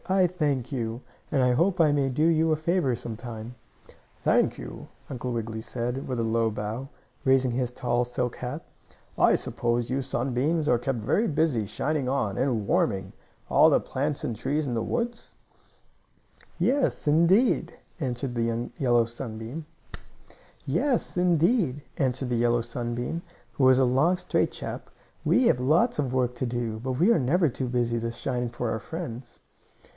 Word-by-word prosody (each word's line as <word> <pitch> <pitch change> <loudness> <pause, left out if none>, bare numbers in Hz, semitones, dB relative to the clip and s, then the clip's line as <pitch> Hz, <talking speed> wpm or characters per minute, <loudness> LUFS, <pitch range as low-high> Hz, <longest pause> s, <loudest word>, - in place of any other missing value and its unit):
I 190 0 +4
thank 150 -8 -1
you, 115 -2 -3 0.3
and 135 -3 +2
I 125 - +4
hope 175 +8 +2
I 155 -3 +5
may 140 -2 +1
do 150 +5 +1
you 160 -1 +3
a - - +4
favor 155 -4 +1
some 115 -1 -5
time." 115 0 -7 0.7
"Thank - - +3
you," - - -8 0.2
Uncle 125 -1 -4
Wiggily 110 -1 -3
said, 125 +3 -3
with 130 - -2
a - - +1
low 115 0 +1
bow, 110 +5 -4 0.3
raising 130 -1 +3
his 125 0 -1
tall 125 -1 0
silk 125 0 -3
hat. 130 +6 -5 0.5
"I - - +5
suppose 120 0 -1
you 135 +1 0
sunbeams 135 +5 0
are 120 -5 +3
kept 130 +1 -1
very 195 - +1
busy 145 -9 +1
shining 135 +5 -1
on, 110 -8 0
and 120 -5 0
warming, 95 -2 +1 0.3
all - - +6
the - - +4
plants 140 +2 -3
and 115 - -2
trees 145 +7 -1
in 125 - -2
the 115 - 0
woods?" 235 - -3 1.2
"Yes, 275 - +1
indeed!" 170 - +4 0.3
answered 125 -2 -2
the 115 0 -1
yellow 120 -3 +3
sunbeam, 120 +5 -6 1.0
who - - +1 2.8
was 130 0 +6
a 130 - +5
long, 140 +9 +3
straight - - 0
chap. - - -6 0.3
"We 255 - +3
have 125 - +4
lots 155 - +2
of 135 -4 0
work 125 -1 +1
to 125 +1 -2
do, 115 -2 -3
but 130 +3 -3
we 170 - +3
are 200 - +4
never 160 +7 +3
too 130 +1 -3
busy 120 -1 0
to 115 +1 -2
shine 125 0 -2
for 120 -1 -3
our 110 - -2
friends." 130 -6 -7
125 Hz, 155 wpm, -27 LUFS, 120-150 Hz, 2.8 s, all